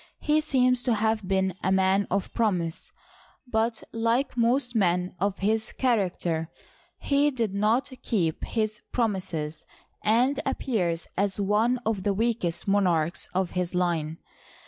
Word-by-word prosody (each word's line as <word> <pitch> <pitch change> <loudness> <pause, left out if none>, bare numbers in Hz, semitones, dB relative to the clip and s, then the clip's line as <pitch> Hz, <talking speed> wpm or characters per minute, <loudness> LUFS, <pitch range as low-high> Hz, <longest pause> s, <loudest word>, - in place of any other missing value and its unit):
He 305 0 +2
seems 255 -4 +2
to 240 -2 +1
have 220 -2 0
been 190 -1 +1
a 190 - 0
man 190 +1 +3
of 195 0 -1
promise," 180 -8 -1 0.5
but, 225 -1 -1
like 230 +4 0
most 245 +1 +2
men 180 -3 +1
of 200 +1 0
his 220 +2 0
character, 180 -9 0 0.5
he 285 +1 +2
did 230 -7 -2
not 215 +7 +1
keep 170 -9 -1
his 215 -1 -2
promises, 175 -9 -2 0.4
and 250 +6 +3
appears 175 -10 -1
as 200 +1 0
one 210 +5 +2
of 215 -3 0
the 200 0 0
weakest 220 -6 -1
monarchs 175 -5 +1
of 185 -1 0
his 180 -1 -2
line. 165 -3 0
205 Hz, 135 wpm, -26 LUFS, 180-235 Hz, 0.5 s, man